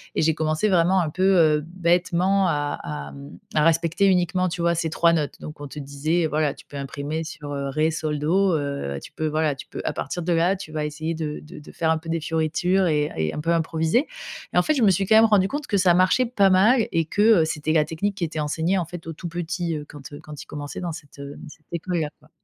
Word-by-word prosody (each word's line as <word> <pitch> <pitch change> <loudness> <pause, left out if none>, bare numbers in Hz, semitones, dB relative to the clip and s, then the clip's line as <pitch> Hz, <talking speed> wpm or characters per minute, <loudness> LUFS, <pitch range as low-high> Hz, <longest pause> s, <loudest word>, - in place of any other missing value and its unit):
et - - +1
j'ai 160 0 +3
commencé, 155 +6 0
vraiment, 185 +1 +3
un 160 - -1
peu, 185 +5 -2 0.3
heu, 150 - -5
bêtement 180 +2 +2
à 145 -3 -1
à, 75 -2 -6
mmh, 70 +4 -11 0.2
à 150 - +4
respecter 165 +3 +2
uniquement, 185 0 +2
tu 170 0 -4
vois, 170 0 +2
ces 165 0 -1
3 170 +1 +3
notes. 150 -3 -2
Donc 150 -1 -9
on 145 - -6
te 150 - -8
disait: 145 +4 -1
«Voilà, 150 -2 0
tu - - -16
peux 145 - -9
imprimer 145 +3 -4
sur, 150 -2 -8
heu, 140 -1 -3
ré, 155 +3 +1
sol, 155 -2 -2
do. 185 +4 +2
Heu, 140 - -3
tu - - -11
peux, 155 - -3
voilà, 155 -1 0
tu 130 - -10
peux, - - -6
à - - -1
partir 175 - -4
de 175 - -1
là, 170 +4 +3
tu 180 -5 -9
vas 155 -1 -2
essayer 155 +2 -3
de 155 -2 -4
de 150 - -11
de 150 - -13
faire 160 - -1
un 160 - +3
peu 160 +1 -11
des 165 0 0
fioritures, 165 +4 +1
et 150 -1 +1
un - - -9
et 80 -1 -1
un - - -4
peu 165 +2 0
improviser». 165 - +1 0.5
Mais, - - +5
en - - +5
fait, 310 - +1
je 255 - +1
me 205 - +6
suis 195 +2 +1
quand 220 - +4
même 220 +1 +8
rendue 205 -4 +4
compte 290 +4 -4
que 205 - +1
ça 180 -2 +4
marchait 185 +8 +3
pas 200 -5 +3
mal, 215 +6 +4
et 165 -1 +1
que, 200 +6 -1 0.2
heu, 160 - +3
c'était 155 0 -2
la 155 -2 +3
technique 190 +6 -2
qui 185 - -4
était 160 -1 -3
enseignée, 160 +5 0
en 175 - -1
fait, 175 +1 -9
aux 165 - -4
tout 170 +3 -7
petits, 170 0 -3
heu, 150 -1 -5
quand, 145 -1 -11
heu 145 - -8
quand 150 -1 -9
ils - - -21
commençaient 145 -1 -7
dans 175 - -3
cette, 150 -3 -11
heu 140 0 -7
cette 155 +1 -15
école-là, 170 -2 -2
quoi. 150 - -23
160 Hz, 265 wpm, -24 LUFS, 150-180 Hz, 0.5 s, même